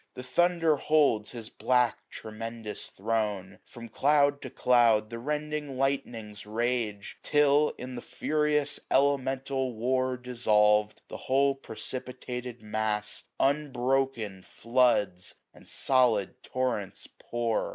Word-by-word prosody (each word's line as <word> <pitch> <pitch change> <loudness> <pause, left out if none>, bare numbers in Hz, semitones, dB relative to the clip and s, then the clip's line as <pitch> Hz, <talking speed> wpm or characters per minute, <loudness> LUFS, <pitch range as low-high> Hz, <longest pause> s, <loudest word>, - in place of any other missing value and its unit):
The 125 - -7
Thunder 165 +3 +2
holds 140 -10 +2
his 115 -3 -8
black 125 -2 +1
tremendous 110 0 -7
throne: 105 -2 -2
From 120 -1 -10
cloud 140 +4 +2
to - - -6
cloud 115 -3 +3
the 115 - -5
rending 150 0 -3
Lightnings 115 -6 -2
rage; 110 -2 -2
Till, 150 0 +3
in 130 +1 -7
the 120 - -6
furious 150 0 0
elemental 135 -2 +1
war 130 +3 0
800 125 - -15
Dissolv'd, 105 -4 +2
the - - -7
whole 140 +1 +2
precipitated 125 -1 -7
mass 105 0 -2
Unbroken 135 -7 0
floods 110 -5 +1 0.2
and - - -16
solid 125 -3 +1
torrents 125 -7 -3
pour. 115 -2 -1
125 Hz, 110 wpm, -28 LUFS, 110-135 Hz, 0.2 s, cloud